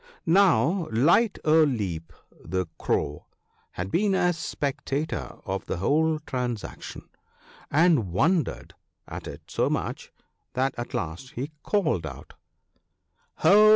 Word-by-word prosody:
Now 170 Hz, -, +4 dB
Light 170 Hz, -, +4 dB
o' 160 Hz, +1 st, +6 dB
Leap, 95 Hz, -, -2 dB, 0.3 s
the 95 Hz, +2 st, -1 dB
Crow, 75 Hz, 0 st, -1 dB, 0.5 s
had 90 Hz, +2 st, -4 dB
been 200 Hz, +1 st, +2 dB
a 180 Hz, -1 st, +3 dB
spectator 145 Hz, -2 st, -3 dB
of 95 Hz, -1 st, -3 dB
the -, -, -2 dB
whole 155 Hz, -, +2 dB
transaction, 125 Hz, -4 st, -4 dB, 0.6 s
and 150 Hz, -, +3 dB
wondered 160 Hz, -, +1 dB, 0.3 s
at -, -, -7 dB
it -, -, -8 dB
so -, -, 0 dB
much -, -, -3 dB, 0.4 s
that 130 Hz, +1 st, +1 dB
at 120 Hz, -, -5 dB
last 85 Hz, +11 st, -4 dB
he 135 Hz, +6 st, -4 dB
called 155 Hz, -, +1 dB
out, 70 Hz, -, -10 dB, 0.5 s
' -, -, -45 dB
Ho 210 Hz, +2 st, +8 dB
140 Hz, 120 wpm, -26 LUFS, -, 0.6 s, Ho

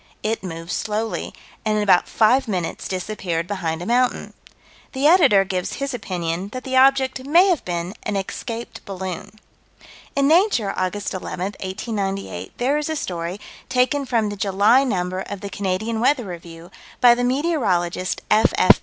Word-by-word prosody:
It 220 Hz, +1 st, -1 dB
moved 165 Hz, -2 st, -6 dB
slowly, 220 Hz, +3 st, -2 dB, 0.3 s
and 215 Hz, -1 st, +1 dB
in 210 Hz, -, +1 dB
about 185 Hz, -3 st, +4 dB
five 250 Hz, +4 st, +3 dB
minutes 180 Hz, -5 st, -3 dB
disappeared 185 Hz, -3 st, -3 dB
behind 175 Hz, -4 st, -3 dB
a -, -, -6 dB
mountain. 245 Hz, +3 st, +1 dB, 0.6 s
The 265 Hz, +2 st, -1 dB
Editor 305 Hz, -, +6 dB
gives 185 Hz, -2 st, -2 dB
his 275 Hz, -1 st, -3 dB
opinion 180 Hz, -5 st, -3 dB
that 255 Hz, 0 st, -5 dB
the 260 Hz, 0 st, -3 dB
object 265 Hz, 0 st, +4 dB
may 350 Hz, +6 st, +6 dB
have 345 Hz, -7 st, +1 dB
been 175 Hz, +1 st, -3 dB
an 210 Hz, -, -3 dB
escaped 230 Hz, +4 st, -5 dB
balloon. 190 Hz, +1 st, -6 dB, 0.8 s
In 275 Hz, 0 st, +3 dB
Nature, 315 Hz, -, +3 dB
Aug. 185 Hz, +1 st, -1 dB
11, 190 Hz, -3 st, -4 dB, 0.2 s
1898, 195 Hz, -, -4 dB
there 275 Hz, +5 st, +1 dB
is 300 Hz, -, -3 dB
a 315 Hz, -, -1 dB
story, 175 Hz, -, -4 dB, 0.3 s
taken 260 Hz, +2 st, +1 dB
from 225 Hz, -4 st, +1 dB
the 205 Hz, -, -4 dB
July 200 Hz, +6 st, +4 dB
number 185 Hz, -7 st, -1 dB
of 200 Hz, 0 st, -7 dB
the 200 Hz, -1 st, -6 dB
Canadian 205 Hz, +4 st, -2 dB
Weather 250 Hz, 0 st, +2 dB
Review, 170 Hz, -1 st, -9 dB, 0.3 s
by 245 Hz, -1 st, +7 dB
the 245 Hz, +1 st, -1 dB
meteorologist, 235 Hz, -, 0 dB
F.F. 215 Hz, +1 st, +5 dB
205 Hz, 155 wpm, -22 LUFS, 185-255 Hz, 0.8 s, by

